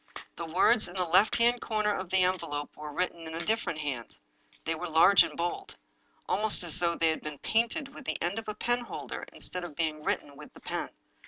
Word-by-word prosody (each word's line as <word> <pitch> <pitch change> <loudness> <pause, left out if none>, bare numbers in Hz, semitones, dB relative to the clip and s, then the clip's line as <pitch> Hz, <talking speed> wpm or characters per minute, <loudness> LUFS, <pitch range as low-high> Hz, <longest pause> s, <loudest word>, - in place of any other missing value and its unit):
The 170 - -5
words 190 +7 +4
in 175 - -11
the 185 -1 +1
left 185 +5 +4
hand 240 +1 +3
corner 215 -2 0
of 185 -3 -4
the 190 0 +3
envelope 155 -5 -2
were 150 0 -7
written 170 0 -2
in 160 - -6
a - - -3
different 215 -2 -1
hand. 135 -6 -4 0.5
They 165 - 0
were 165 +2 -5
large 165 +5 +7
and - - -6
bold; 280 - -3 0.5
almost 210 +1 +2
as 175 0 +1
though 170 -1 +1
they 165 -1 +3
had 160 - -1
been 150 -1 -6
painted 240 - 0
with 280 - -11
the - - -2
end 180 +6 -1
of 225 - -9
the 215 - -4
penholder 240 +2 -3
instead 180 0 -4
of 170 -4 -7
being 155 -1 -1
written 145 -1 -2
with 150 +1 -12
the - - -12
pen. - - -3
180 Hz, 220 wpm, -30 LUFS, 160-215 Hz, 0.5 s, large